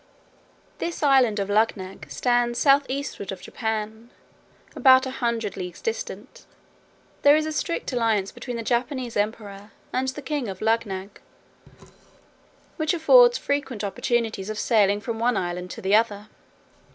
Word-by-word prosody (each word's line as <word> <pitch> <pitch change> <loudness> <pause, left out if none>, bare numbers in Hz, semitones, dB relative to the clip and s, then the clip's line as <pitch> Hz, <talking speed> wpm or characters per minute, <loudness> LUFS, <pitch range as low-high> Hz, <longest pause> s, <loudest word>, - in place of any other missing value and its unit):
This 340 -2 -4
island 260 -6 +4
of 200 -1 -1
Luggnagg 205 -2 -1
stands 240 -1 +1
south 280 0 +4
eastward 265 -7 -4
of 190 - -7
Japan, 220 0 -4 0.7
about 260 -1 +6
a 260 - -4
hundred 235 -5 -2
leagues 180 -1 -7
distant. 485 +2 -6 0.7
There 285 +1 +7
is 310 0 +1
a 315 - -3
strict 310 -2 -3
alliance 220 -5 +1
between 240 0 -6
the 230 - -4
Japanese 245 +1 -2
emperor 205 -1 -4 0.2
and 260 +1 0
the 280 +2 -5
king 280 -2 -2
of 190 -2 -6
Luggnagg; 210 -3 -2 1.6
which 315 +1 0
affords 485 +9 +6
frequent 270 -6 -3
opportunities 220 0 -1
of 215 - -4
sailing 205 -3 +2
from 225 +2 -4
one 240 -1 +1
island 180 0 -3
to - - -9
the 190 +1 +1
other. 215 -1 +2
230 Hz, 140 wpm, -24 LUFS, 205-270 Hz, 1.6 s, There